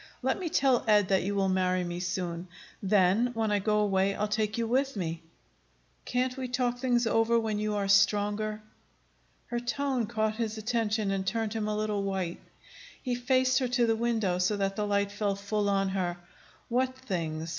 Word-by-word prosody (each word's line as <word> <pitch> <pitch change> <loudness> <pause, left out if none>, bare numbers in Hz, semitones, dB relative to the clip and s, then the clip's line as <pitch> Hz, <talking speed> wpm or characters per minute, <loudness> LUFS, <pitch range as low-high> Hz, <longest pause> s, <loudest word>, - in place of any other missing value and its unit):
Let 265 +6 +1
me 355 -3 -3
tell 265 -5 +3
Ed 210 -3 +4
that 190 -1 +3
you 200 +2 -2
will 195 -1 +2
marry 185 -1 +1
me 175 0 -4
soon. 180 -1 -3 0.3
Then, 195 +3 +3
when 220 -1 0
I 205 - +2
go 210 +1 +1
away, 195 -1 +2
I'll 210 - -1
take 215 +1 -1
you 230 - 0
with 265 +3 0
me." 165 -4 -3 0.8
"Can't 250 +1 0
we 260 -1 -4
talk 245 -1 -1
things 245 -2 +2
over 225 +1 +3
when 220 -2 -2
you 210 0 -1
are 200 -1 -1
stronger?" 210 +2 +2 0.9
Her 240 - 0
tone 245 -1 -1
caught 220 -1 -1
his 225 -2 -2
attention, 220 -2 0
and 195 -1 -1
turned 225 0 -1
him 220 -2 -2
a 210 0 -1
little 210 -1 -1
white. 190 -3 -3 0.6
He 250 - -2
faced 255 +2 +2
her 255 - 0
to 245 0 +2
the 225 -1 +2
window, 220 -6 0
so 190 +3 +1
that 195 -1 -1
the 210 0 -1
light 200 0 +1
fell 205 -1 -1
full 205 +1 -1
on 195 -1 +1
her. 180 -2 -2 0.5
"What 255 +2 0
things? 165 -9 -3
210 Hz, 190 wpm, -29 LUFS, 195-235 Hz, 0.9 s, Ed